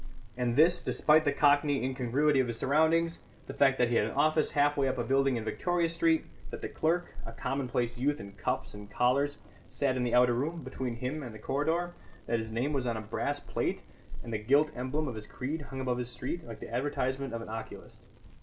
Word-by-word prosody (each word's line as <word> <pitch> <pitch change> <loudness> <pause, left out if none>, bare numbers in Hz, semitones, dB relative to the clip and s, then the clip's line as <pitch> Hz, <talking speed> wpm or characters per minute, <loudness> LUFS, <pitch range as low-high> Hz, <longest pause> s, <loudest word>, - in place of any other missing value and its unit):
And 120 -1 0
this 165 +5 +5
despite 155 +1 +3
the 145 - +3
cockney 145 -2 +3
incongruity 135 +3 +1
of 130 - +2
his 115 -1 -3
surroundings; 160 +5 +2 0.3
the - - -7
fact 135 -1 +4
that 125 -1 +3
he 120 - +2
had - - +3
an 110 - -4
office 155 +2 +3
half 145 0 +3
way 140 -1 +2
up 130 0 -1
a 120 - 0
building 135 +1 +2
in 115 - -3
Victoria 175 +8 0
Street; 165 -1 +2 0.2
that - - -8
the - - -3
clerk 175 +3 0
(a - - -7
commonplace 125 -1 -2
youth 145 +3 +1
in 100 0 -8
cuffs 100 - -3
and 105 0 -10
collars) 140 +6 +1 0.3
sat 135 -2 0
in 130 - -1
the 120 -1 +1
outer 125 0 +5
room, 155 +6 -2
between 125 -3 -4
him 130 +6 -3
and 120 -5 -7
the - - -7
corridor; 160 +9 -1 0.3
that 115 0 0
his 110 0 -4
name 120 +7 -1
was 130 -3 -1
on 115 -2 -1
a - - -4
brass 105 - -2
plate, - - -2 0.4
and 115 - -6
the 110 - -1
gilt 140 +8 +3
emblem 130 +5 -2
of 130 - -3
his 110 -1 -8
creed 150 +5 -4
hung 135 - -6
above 125 -2 -1
his 125 -1 -3
street, 130 +6 -5
like 115 - -8
the - - -9
advertisement 135 +1 -1
of 115 0 -4
an - - -10
oculist. 110 0 -8
135 Hz, 225 wpm, -30 LUFS, 120-150 Hz, 0.4 s, this